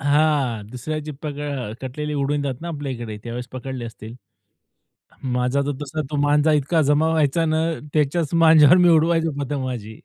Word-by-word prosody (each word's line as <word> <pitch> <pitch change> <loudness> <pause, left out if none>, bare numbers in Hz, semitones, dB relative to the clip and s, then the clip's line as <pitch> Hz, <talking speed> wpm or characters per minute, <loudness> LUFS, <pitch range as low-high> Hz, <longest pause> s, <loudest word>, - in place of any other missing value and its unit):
हां, 140 -7 +1
दुसऱ्याची 155 +4 -5
पकड 145 -1 -5 0.2
अ, 110 -4 -5
कटलेली 150 +3 -4
उडवितात 140 -2 -1
ना 170 - -5
आपल्या 145 -4 -4
इकडे. 115 -3 -6
त्यावेळेस 120 +1 -6
पकडले 130 -1 -6
असतील. 115 0 -9 1.1
माझा 125 +1 0
तर 145 - 0
तसा 155 +2 -4
तो 150 - -2
मांजा 145 +2 +3
इतका 150 +3 +2
जमा 150 +2 +2
व्हायचा 160 0 +2
ना, 160 0 +1 0.3
त्याच्याच 150 +2 0
मांज्यावर 160 0 +7
मी 180 -1 +5
उडवायचो 165 0 +3
पतंग 140 0 -3
माझी. 110 -4 -6
145 Hz, 160 wpm, -22 LUFS, 130-155 Hz, 1.1 s, मांज्यावर